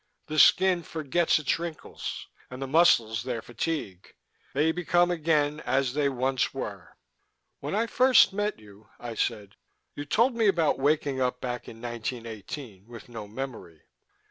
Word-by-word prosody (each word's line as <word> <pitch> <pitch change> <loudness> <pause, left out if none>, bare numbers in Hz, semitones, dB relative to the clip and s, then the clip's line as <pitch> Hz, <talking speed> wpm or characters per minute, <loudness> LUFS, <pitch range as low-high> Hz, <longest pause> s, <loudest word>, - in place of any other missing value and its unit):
The 155 0 -1
skin 185 +1 +5
forgets 160 +1 +1
its 155 +1 0
wrinkles, 170 -2 -6 0.2
and 125 - -8
the 135 - -3
muscles 130 -8 +4
their 120 -2 -4
fatigue. 120 - -4 0.4
They 155 +3 +3
become 175 +1 +2
again 155 -3 +1
as 130 -1 0
they 145 -1 +1
once 130 0 -1
were." - - -7 0.6
"When - - -4
I 225 +2 +2
first 255 -3 +5
met 205 +1 -1
you," 105 0 -17
I 120 -1 -6
said, 105 -3 -3 0.4
"you 145 - -5
told 230 - +2
me 225 -2 +2
about 165 -8 +2
waking 140 -1 +1
up 125 0 0
back 125 -1 -5
in 115 - -12
1918, 115 -2 -6
with 120 0 -11
no 110 -3 -7
memory." 110 - -7
135 Hz, 150 wpm, -27 LUFS, 115-165 Hz, 0.6 s, skin